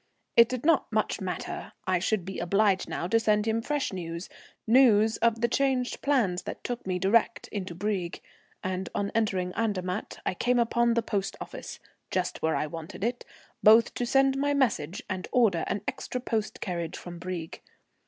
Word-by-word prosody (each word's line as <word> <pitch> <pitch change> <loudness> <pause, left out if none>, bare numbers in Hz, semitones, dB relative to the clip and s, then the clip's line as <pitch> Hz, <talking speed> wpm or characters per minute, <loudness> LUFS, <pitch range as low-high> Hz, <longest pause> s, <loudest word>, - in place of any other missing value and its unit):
It 235 0 +7
did 255 +1 -4
not 325 -7 +3
much 215 0 0
matter. 180 -2 -5
I 185 -1 +2
should 190 0 0
be 190 0 -5
obliged 195 +2 +2
now 170 - -2
to 225 +4 +3
send 210 -1 +2
him 225 +1 +1
fresh 290 -2 -1
news, 170 -1 -5 0.4
news 225 -3 +5
of 230 -1 +2
the 235 - +4
changed 255 0 0
plans 230 -11 +2
that - - -7
took 245 -4 -4
me 185 -1 0
direct 215 +5 +2
into 185 -4 -5
Brieg; 190 -2 -2 0.4
and 185 0 -3
on 200 0 -1
entering 190 -5 0
Andermatt 200 -3 -2
I - - 0
came 245 +7 +1
upon 235 0 +2
the 235 - +1
post 200 -3 -2
office, - - -8 0.3
just 185 -1 -2
where 160 0 +1
I - - 0
wanted 165 +4 -7
it, 240 +2 -1 0.4
both 220 +2 +6
to 245 - -2
send 270 +1 +3
my 285 +1 +1
message 205 - 0
and 185 -2 -4
order 220 -10 +3
an 200 - -1
extra 250 - -3
post 220 -4 -3
carriage 170 -3 -3
from 175 -1 -9
Brieg. 170 -2 -5
210 Hz, 180 wpm, -28 LUFS, 185-235 Hz, 0.4 s, It